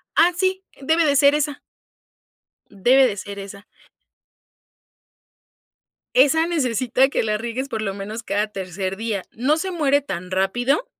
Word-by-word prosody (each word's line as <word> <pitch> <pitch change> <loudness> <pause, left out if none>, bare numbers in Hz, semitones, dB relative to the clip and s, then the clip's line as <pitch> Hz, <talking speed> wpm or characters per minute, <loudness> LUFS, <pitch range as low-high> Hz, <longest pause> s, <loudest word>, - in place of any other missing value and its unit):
Ah, 355 - +5
sí. 375 +1 0 0.2
Debe 320 +4 +2
de 285 - +2
ser 280 +1 +5
esa. 295 -1 -2 1.1
Debe 250 +7 +4
de 205 -4 -4
ser 200 +1 -7
esa. 200 +1 -10 2.5
Esa 320 - +4
necesita 260 -4 +1
que 275 - -1
la 215 -1 0
riegues 235 +4 -4
por 220 -3 -3
lo 195 -2 -2
menos 210 +3 -6
cada 205 +2 -1
tercer 190 -1 -5
día, 220 -4 -3
no 270 +7 +1
se 375 +3 -3
muere 290 -5 +2
tan 180 -9 -6
rápido 245 - 0
245 Hz, 140 wpm, -22 LUFS, 200-290 Hz, 2.5 s, Ah